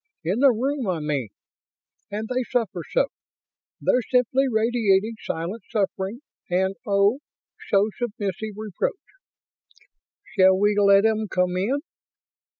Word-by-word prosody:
In 185 +8 0
the 275 +1 +7
room, 260 +2 -1
I 180 -3 0
mean. 145 -7 -2 0.8
And 215 +2 -4
they 255 +1 -1
suffer 210 -7 -1
so. - - +2 0.7
They're 250 - +2
simply 255 +2 +3
radiating 220 -2 +2
silent 175 +8 -4
suffering 200 +2 -2 0.3
and 190 +2 +1
oh 200 +5 +3 0.5
so 200 +1 +4
submissive 215 -3 -3
reproach. 215 - -2 1.4
Shall 190 0 +6
we 205 +1 +2
let 200 0 +5
'em 220 -1 +1
come 180 -2 0
in?" 235 +10 0
205 Hz, 120 wpm, -24 LUFS, 190-235 Hz, 1.4 s, the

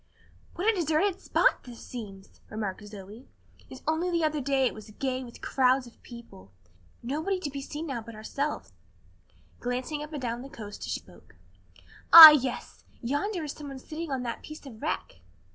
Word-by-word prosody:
"What 365 +5 -2
a 445 - +4
deserted 345 +3 0
spot - - +2
this 240 -2 -12
seems!" 200 -5 -10
remarked 215 -2 -5
Zoe, 205 +4 -12 0.4
"and 260 - -11
only 320 +3 0
the 340 -2 0
other 305 -1 0
day 270 0 +1
it - - 0
was 215 0 -12
gay 260 +4 -3
with 240 -2 -13
crowds 260 0 +2
of 240 - -17
people. 235 - -13 0.5
Nobody 315 +10 -2
to 300 -6 -5
be 275 0 -6
seen 295 +3 -6
now 270 -7 -4
but 230 0 -11
ourselves," 275 - -4 0.9
glancing 255 +5 -3
up 300 +1 -8
and 300 - -5
down 240 -1 -4
the 270 - -10
coast 210 -5 -9
as - - -7
she - - -2
spoke. - - -20 0.8
"Ah, 320 -2 +14
yes! 265 -4 -2 0.2
yonder 315 - -2
is 295 - -4
someone 285 -3 -9
sitting 315 +5 -7
on 265 -2 -3
that 235 - -5
piece 305 -1 -11
of 230 -5 -12
wreck." 85 - -4
265 Hz, 180 wpm, -27 LUFS, 235-310 Hz, 0.9 s, Ah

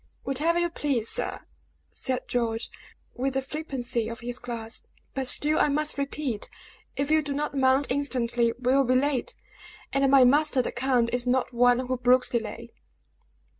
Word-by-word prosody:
"Whatever 305 +6 +1
you 345 0 0
please, 270 -9 -1
sir," - - -2 0.5
said 255 -1 -3
George, 230 -2 -2 0.4
with 265 +1 -2
the 270 - +1
flippancy 260 -6 -3
of 230 0 -8
his 245 +1 -5
class; 230 -2 -5 0.3
"but 265 -1 -2
still 300 +4 +4
I - - +3
must 300 +1 0
repeat, 275 -5 -3 0.5
if 280 +2 -1
you 315 0 +4
do 285 -2 -4
not 295 0 -2
mount 265 +1 +3
instantly, 245 -4 +1
we 255 0 +1
will 275 0 +4
be 255 0 +1
late; 270 -1 0 0.6
and 275 0 +3
my 270 -1 +7
master, 280 0 +3
the - - -3
count, 240 -2 +1
is 245 0 0
not 255 0 +1
one 245 +1 +3
who 255 0 -2
brooks 250 +1 +3
delay." 235 0 -4
260 Hz, 170 wpm, -26 LUFS, 245-280 Hz, 0.6 s, my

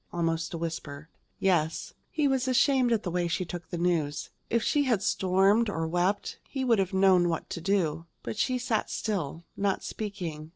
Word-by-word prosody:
almost 165 -1 -1
a 170 - -4
whisper. 160 -2 -5 0.3
"Yes." 165 -4 +1 0.2
He 300 -2 +1
was 265 -1 +1
ashamed 255 -1 +3
at 225 -2 +2
the 175 - -3
way 175 0 0
she 170 +2 -1
took 175 +1 -7
the 175 - -3
news. 165 -4 0 0.2
If 235 -1 +1
she 290 -1 +2
had 225 -7 +1
stormed 195 +5 +3
or 165 -5 -2
wept, 180 +4 0
he 265 -2 -2
would 230 -4 +4
have 190 -1 0
known 190 -2 +4
what 165 - -3
to 170 - -4
do. 170 -4 0 0.2
But - - -4
she 255 +4 +1
sat 240 -3 -1
still, 170 -7 -3
not 195 -1 0
speaking. 170 -8 -5
185 Hz, 190 wpm, -28 LUFS, 165-220 Hz, 0.3 s, would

